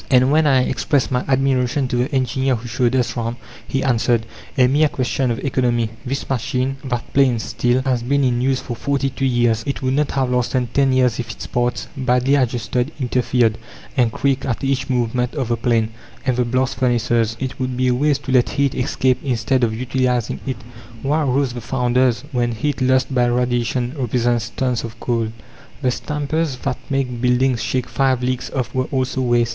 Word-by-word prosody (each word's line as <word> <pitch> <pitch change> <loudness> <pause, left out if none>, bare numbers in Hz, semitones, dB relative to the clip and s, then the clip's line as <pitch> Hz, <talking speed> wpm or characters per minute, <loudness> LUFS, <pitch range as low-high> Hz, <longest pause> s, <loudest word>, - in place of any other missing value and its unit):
And 130 0 +4
when 155 0 +4
I 130 -3 +4
expressed 135 0 0
my 125 0 +1
admiration 130 0 +1
to - - -1
the 125 +5 0
engineer 130 0 +1
who 120 +1 -7
showed 120 +2 +1
us 120 -1 0
round, 115 0 -2 0.3
he 135 - -1
answered 120 -2 +2 0.3
"A 130 - +6
mere 145 +4 +3
question 130 -1 -1
of 115 - -1
economy! 120 -4 +1
This 135 +1 -3
machine, 130 +1 -1
that 125 -3 -4
planes 130 -5 +3
steel, 125 +1 0
has 125 -3 +1
been 140 +4 +1
in 125 -2 +1
use 130 0 +1
for 120 - -5
forty 140 +2 -1
two 135 +1 -1
years. 120 -3 +2
It 140 -1 -3
would 130 0 +1
not 145 0 +1
have 130 -2 0
lasted 125 -1 0
ten 135 -1 +3
years 125 -3 +2
if 120 -2 -4
its - - -6
parts, 120 0 -1
badly 130 0 +2
adjusted, 125 0 0
'interfered' 125 -3 +1 0.4
and 120 -4 +3
creaked 135 +2 0
at 120 0 -2
each 135 0 0
movement 125 +1 0
of 130 -5 -2
the 120 - +2
plane! 115 -1 +1 0.4
"And 130 -2 +2
the 125 0 +1
blast 130 +2 0
furnaces? 120 -2 +1
It 130 0 -4
would 130 -1 -2
be 130 0 +2
a - - +3
waste 145 +2 +1
to 135 - -4
let 125 -2 +4
heat 140 -1 +1
escape 130 0 +1
instead 125 0 0
of 115 - +2
utilizing 125 -2 0
it. 130 -3 -2 0.5
Why 150 +3 +1
roast 135 -2 +1
the 120 - -6
founders, 125 0 +1
when 120 -2 0
heat 135 +5 -2
lost 130 +1 +2
by 125 -1 +3
radiation 120 0 0
represents 120 -3 0
tons 125 -2 -1
of 115 0 -8
coal? 115 -2 0 0.6
"The 125 - +3
stampers 150 +2 -2
that 135 -2 -2
made 130 -4 -1
buildings 125 -1 +2
shake 125 +3 -1
five 130 -2 +1
leagues 125 0 -1
off 130 -3 -2
were 130 -1 0
also 130 -1 -1
waste. 120 -2 +2
125 Hz, 195 wpm, -20 LUFS, 120-135 Hz, 0.6 s, A